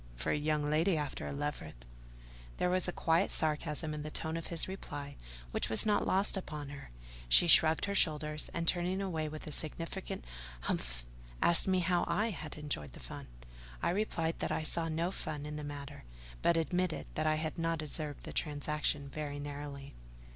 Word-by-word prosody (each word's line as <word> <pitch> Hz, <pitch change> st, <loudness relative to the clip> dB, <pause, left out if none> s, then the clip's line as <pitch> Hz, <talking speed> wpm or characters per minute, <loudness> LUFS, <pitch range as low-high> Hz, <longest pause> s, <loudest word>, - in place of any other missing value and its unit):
for -, -, -1 dB
a -, -, +3 dB
young 150 Hz, 0 st, +1 dB
lady 155 Hz, +4 st, +3 dB
after 150 Hz, -2 st, -3 dB
a -, -, -3 dB
leveret." 140 Hz, -, -4 dB, 0.7 s
There 180 Hz, -, +2 dB
was 185 Hz, 0 st, +2 dB
a -, -, +1 dB
quiet 165 Hz, +2 st, +3 dB
sarcasm 155 Hz, 0 st, -1 dB
in 150 Hz, -, -3 dB
the 155 Hz, -, -4 dB
tone 160 Hz, +1 st, -2 dB
of 165 Hz, -, -3 dB
his 170 Hz, -2 st, +1 dB
reply 145 Hz, -7 st, -6 dB, 0.4 s
which -, -, 0 dB
was 110 Hz, -, +3 dB
not 210 Hz, -1 st, +3 dB
lost 195 Hz, +3 st, +2 dB
upon 150 Hz, -6 st, -4 dB
her; 140 Hz, -1 st, -8 dB, 0.4 s
she 120 Hz, -, +8 dB
shrugged 160 Hz, -1 st, +7 dB
her 200 Hz, -, -1 dB
shoulders, 150 Hz, -4 st, +2 dB
and, 170 Hz, 0 st, -2 dB
turning 180 Hz, +2 st, +2 dB
away 165 Hz, -6 st, -1 dB
with 155 Hz, 0 st, -7 dB
a 155 Hz, -, -5 dB
significant 165 Hz, -, -3 dB, 0.4 s
"Humph!" -, -, -2 dB, 0.3 s
asked 170 Hz, +2 st, +5 dB
me 185 Hz, -1 st, +4 dB
how 175 Hz, 0 st, +3 dB
I 220 Hz, +2 st, +2 dB
had 155 Hz, -5 st, -6 dB
enjoyed 135 Hz, -, -3 dB
the -, -, -10 dB
fun. -, -, -7 dB, 0.6 s
I -, -, +3 dB
replied 170 Hz, -4 st, 0 dB
that -, -, -1 dB
I -, -, 0 dB
saw 165 Hz, +1 st, 0 dB
no 165 Hz, +3 st, 0 dB
fun 150 Hz, -5 st, -4 dB
in 150 Hz, 0 st, -4 dB
the 150 Hz, -, -4 dB
matter; 145 Hz, 0 st, -6 dB, 0.4 s
but 170 Hz, -, +4 dB
admitted 180 Hz, +1 st, 0 dB
that 155 Hz, 0 st, 0 dB
I 155 Hz, -, +4 dB
had 155 Hz, +1 st, -2 dB
not 165 Hz, -1 st, 0 dB
observed 150 Hz, -1 st, -5 dB
the -, -, -7 dB
transaction 150 Hz, -1 st, 0 dB
very 145 Hz, 0 st, -4 dB
narrowly. 145 Hz, -1 st, -6 dB
155 Hz, 190 wpm, -34 LUFS, 145-170 Hz, 0.7 s, she